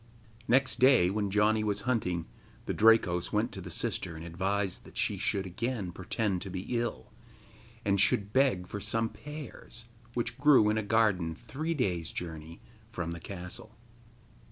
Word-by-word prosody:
Next 130 -2 +3
day, 125 -8 +6
when 100 0 -1
Janni 105 +2 +3
was 105 -1 0
hunting, 95 -9 -1 0.4
the - - -2
Drakos 105 -6 +4
went - - +1
to - - -7
the - - -8
sister 85 - -2
and 80 +1 -8
advised 95 +2 -1
that - - -13
she - - 0
should 95 -1 0
again 100 +1 -3
pretend 95 +1 -2
to 95 - -6
be 95 0 -4
ill, 115 - -3 0.7
and 100 -1 +3
should 100 +1 +2
beg 130 -9 +3
for 105 +3 -6
some 110 +2 0
pears, 145 -5 -9 0.3
which 120 - -2
grew 135 -8 +6
in 110 - 0
a - - 0
garden 100 -6 +2
three 145 - -4
days' 90 - -1
journey 80 -1 -6 0.3
from 85 -6 -4
the 85 - -5
castle. 95 +5 -8
100 Hz, 160 wpm, -30 LUFS, 90-115 Hz, 0.7 s, day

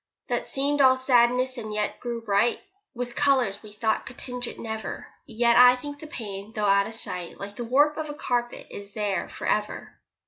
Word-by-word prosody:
That - - -1
seemed 285 +1 +1
all 260 -1 +6
sadness, 255 0 +3
and 215 -2 -6
yet 210 0 -2
grew 235 -1 -4
bright 210 +2 +2 0.4
With 245 0 -5
colours 260 -9 +2
we 215 - -12
thought 220 +1 -1
could 240 - -10
tinge 250 -1 -4
it - - -8
never. 220 -1 -5 0.2
Yet 235 +1 +2
I 250 0 +9
think 290 +3 -8
the 310 - -9
pain 210 -5 -7
though 210 -1 0
out 200 0 +4
of 225 - -5
sight, 180 -5 -4
Like 200 +1 -7
the 240 - -5
warp 290 +5 +3
of 315 -1 -3
the 295 - -6
carpet, 240 -4 -2
is 200 0 -9
there 205 -3 -1
for - - -7
ever. 210 0 -2
235 Hz, 205 wpm, -26 LUFS, 210-255 Hz, 0.4 s, I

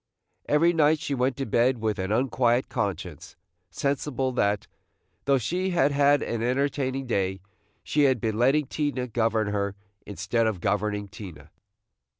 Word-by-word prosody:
Every 165 +4 +4
night 155 -1 +4
she 145 - -4
went 130 -1 0
to 135 - -2
bed 120 +3 +2
with 110 -2 -2
an 95 +2 -2
unquiet 120 +1 +1
conscience, - - -4 0.3
sensible 135 -2 -1
that, 105 -5 0 0.6
though 140 -1 +4
she 180 - -1
had 145 -6 +2
had 145 0 +3
an 115 -1 -3
entertaining 135 +1 -1
day, 95 -5 -1 0.4
she 150 -1 +2
had 130 -3 +3
been 110 0 -2
letting 135 +5 +3
Tina 145 -2 -2
govern 110 -2 0
her, 100 -1 -2 0.3
instead 115 +3 0
of 105 -5 -2
governing 105 +2 -1
Tina. 90 -7 -11
125 Hz, 150 wpm, -26 LUFS, 105-140 Hz, 0.6 s, Every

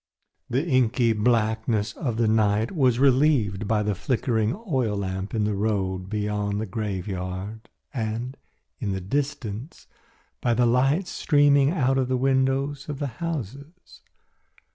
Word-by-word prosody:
The 130 +6 0
inky 125 -5 +2
blackness 110 -1 +1
of 120 -7 -3
the 115 -1 +2
night 110 0 +2
was 130 -9 +2
relieved 130 -7 +3
by 105 -1 +1
the 105 0 0
flickering 115 - 0
oil 125 - 0
lamp 95 +1 -3
in 110 - +1
the 105 0 0
road 95 -3 -1
beyond 105 -1 -1
the 110 - -2
graveyard 95 0 -4 0.2
and, 115 +1 -3 0.4
in 105 -7 -2
the 95 - -2
distance, 130 - -4 0.6
by 120 -1 +2
the 120 +1 +3
lights 135 +10 +2
streaming 145 -2 +4
out 135 -5 +1
at 130 - +1
the 130 0 0
windows 135 +2 0
of 145 - -3
the 145 - -2 0.2
houses. 150 - -6
115 Hz, 140 wpm, -25 LUFS, 105-135 Hz, 0.6 s, streaming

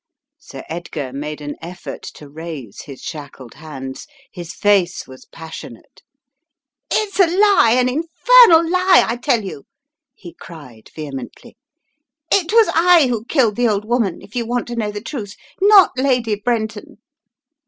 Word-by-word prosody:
Sir - - -11
Edgar 160 -5 -6
made 150 +2 -6
an 145 0 -6
effort 175 +2 -8
to 150 - -12
raise 150 -7 -9
his 135 -3 -11
shackled 140 -6 -9
hands. 135 -4 -9 0.2
His 175 -2 -8
face 195 -4 +1
was 130 0 -14
passionate. 160 -7 -12 0.9
"It's 420 -2 -1
a 375 - +6
lie, 370 - +4
an 250 0 +2
infernal 335 - +5
lie, 365 +1 +4
I 230 - -1
tell 240 -2 0
you!" 145 -7 -8 0.5
he 175 -2 -12
cried, 145 -11 -14
vehemently. 140 -5 -9 0.8
"It 350 -3 +2
was 455 0 +4
I 340 -5 +5
who 230 -2 -3
killed 240 -6 +1
the 245 0 +2
old 210 -1 -1
woman, 230 -5 -1
if 205 - -16
you 240 - -1
want 245 0 -2
to 240 - -5
know 220 -3 -2
the 205 0 -7
truth. 220 -5 -7 0.3
Not 400 -2 +6
Lady 255 -4 0
Brenton 215 0 -3
215 Hz, 150 wpm, -18 LUFS, -, 0.9 s, a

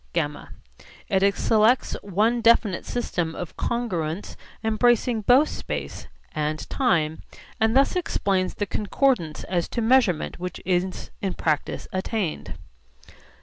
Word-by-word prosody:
(γ) 150 -3 -2 0.6
It 195 0 +3
selects 225 +6 +3
one 215 +5 +1
definite 225 -5 +3
system 175 -9 -2
of 175 - -6
congruence 185 -7 -2 0.3
embracing 230 +1 +2
both 255 +8 +5
space - - -5 0.3
and 150 -2 -2
time, 160 - +1 0.4
and 225 +3 +3
thus 275 +5 +3
explains 195 - 0
the 205 - -1
concordance 205 - 0
as 175 -2 -1
to 235 - -3
measurement 225 -11 +2
which 180 0 -5
is 185 0 -1
in 195 -2 -2
practice 155 -2 -1
attained. 185 - -3
200 Hz, 115 wpm, -24 LUFS, 170-235 Hz, 0.6 s, both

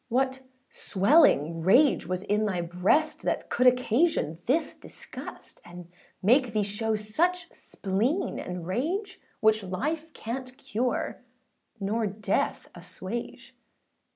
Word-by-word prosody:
What 260 +2 +1 0.3
swelling 185 - +3
rage 245 - +4
was 185 +1 -2
in 210 +1 +1
thy 185 -4 -1
breast, 180 - +1
That - - -2
could 250 +1 +3
occasion 250 - +2
this 305 +7 +1
disgust, - - -10
And 175 0 -12 0.3
make 245 +3 +4
thee 215 -1 +2
show 215 +2 -1
such 325 +13 -1
spleen 225 - -2
and 180 -2 -5
rage, 355 - -2 0.2
Which 220 0 +4
life 300 - -3
canât 255 +2 -6
cure 245 -1 -2 0.6
nor 215 +2 0
death 200 0 -1
assuage? 185 +6 -7
220 Hz, 115 wpm, -27 LUFS, 190-265 Hz, 0.6 s, rage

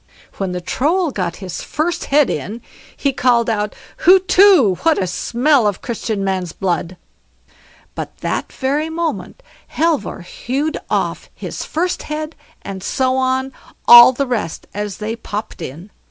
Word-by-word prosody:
When 195 -2 -2
the 180 0 -4
Troll 320 - 0
got 180 -6 -3
his 180 - -5
first 325 +3 -2
head 285 -1 +3
in 205 - -5 0.3
he 280 -1 0
called 240 -3 +2
out 210 -1 -2 0.2
"HUTETU, 370 - +5
what 325 -1 +3
a 190 - 0
smell 240 - +2
of 200 -3 -3
Christian 220 -4 -3
man's 185 -3 -2
blood!" 180 -1 -2 1.0
But - - -7
that - - -2
very 285 +4 -1
moment 335 +9 -4 0.3
Halvor 320 - 0
hewed 275 - -3
off - - -2
his - - -6
first 355 +3 -2
head, 305 +1 -5 0.3
and 195 -1 -6
so 260 +6 0
on, 260 0 0 0.3
all 240 +1 +11
the 275 +2 -2
rest 225 -10 -3
as 205 -1 -4
they 220 +2 -3
popped 210 -5 -6
in. 165 +7 -8
245 Hz, 145 wpm, -18 LUFS, 195-300 Hz, 1.0 s, all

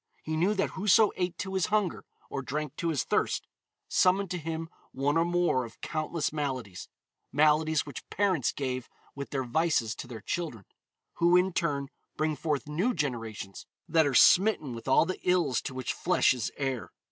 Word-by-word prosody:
He 155 - -3
knew 185 +7 +2
that 195 - 0
whoso 210 +2 +4
ate 180 -1 -2
to 190 -1 -4
his 190 -2 +1
hunger, 210 -5 0 0.2
or 135 - -4
drank 150 +2 -4
to 170 - -2
his 150 -7 0
thirst, - - 0 0.4
summoned 190 +1 +2
to 180 - -2
him 165 0 -4 0.2
one 140 +3 0
or 165 - +4
more 175 -7 +1
of 115 -1 -11
countless 155 -1 -2
maladies 130 - -4 0.4
maladies 155 +1 +3
which 145 -4 -9
parents 190 - +1
gave 130 -3 -4 0.2
with 140 0 -6
their 135 -2 -2
vices 125 -3 +1
to 135 - -7
their 115 -4 -8
children, 120 - -4 0.5
who, 175 +1 +5
in 185 0 +2
turn, 140 -6 -1 0.3
bring 155 0 0
forth 150 -1 -2
new 180 +12 0
generations 115 - -4 0.2
that 160 -3 +3
are 135 - -1
smitten 185 - +5
with 115 +2 -9
all 130 - +5
the 185 - -4
ills 175 -8 +2
to 130 - -6
which 130 -1 -2
flesh - - +3
is 120 -3 -3
heir. 135 -8 -2
155 Hz, 180 wpm, -29 LUFS, 130-175 Hz, 0.5 s, who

